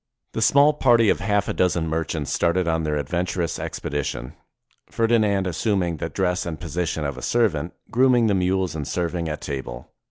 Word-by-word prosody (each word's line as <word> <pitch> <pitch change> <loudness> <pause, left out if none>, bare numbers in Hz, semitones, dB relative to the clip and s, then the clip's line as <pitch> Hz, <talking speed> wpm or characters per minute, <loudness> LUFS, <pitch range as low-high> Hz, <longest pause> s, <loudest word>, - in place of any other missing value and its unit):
The 110 - -2
small 140 +6 +5
party 120 -6 +4
of - - +2
half 100 0 0
a - - -1
dozen 85 -3 +1
merchants 80 -3 -2
started 85 +1 +1
on 80 -1 +1
their 75 -1 -1
adventurous 85 +3 -2
expedition, 70 -3 -4 0.6
Ferdinand 110 -4 +2
assuming 90 -1 0
the - - -4
dress 90 -1 0
and 80 -3 -5
position 85 -2 -2
of 70 -2 -4
a - - -10
servant, 90 - 0 0.2
grooming 125 -1 +4
the 105 - +2
mules 95 -1 0
and 75 -2 -4
serving 85 -1 -2
at 75 - -5
table. 65 -4 -6
90 Hz, 170 wpm, -23 LUFS, 80-100 Hz, 0.6 s, small